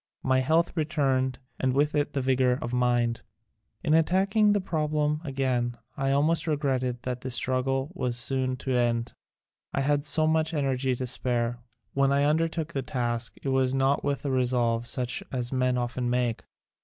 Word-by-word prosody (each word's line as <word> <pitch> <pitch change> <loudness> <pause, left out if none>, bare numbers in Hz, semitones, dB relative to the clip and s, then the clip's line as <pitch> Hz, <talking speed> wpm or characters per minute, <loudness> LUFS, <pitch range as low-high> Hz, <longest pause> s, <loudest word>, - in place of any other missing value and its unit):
My 130 0 +3
health 160 +7 +2
returned 135 -5 0 0.2
and 130 -1 +1
with 145 +2 +2
it 145 -1 0
the 140 - 0
vigor 130 -1 +2
of 125 -6 -5
mind. 120 -1 +1 0.6
In 155 - +2
attacking 195 +6 +3
the 205 - +3
problem 150 -4 -1
again 130 -4 -1 0.2
I 135 0 -1
almost 155 +4 +2
regretted 130 -5 -1
that 125 -1 -3
the 130 - -4
struggle 130 +3 0
was 125 -9 -2
soon 130 +1 -1
to 135 - -1
end. 120 -1 +1 0.6
I 140 - +1
had 145 +1 +1
so 155 +1 +2
much 160 +1 +1
energy 135 -2 0
to 130 - -3
spare. 120 -1 -1 0.3
When 135 0 +2
I 140 0 +3
undertook 160 +2 0
the 135 - -1
task 120 -2 -2
it 135 - -1
was 130 0 +2
not 135 +1 +2
with 140 0 -2
a 140 - 0
resolve 120 -2 +1
such 125 +1 -1
as 125 -1 -2
men 125 -1 +1
often 120 0 -2
make. 120 -2 -1
130 Hz, 170 wpm, -27 LUFS, 125-150 Hz, 0.6 s, My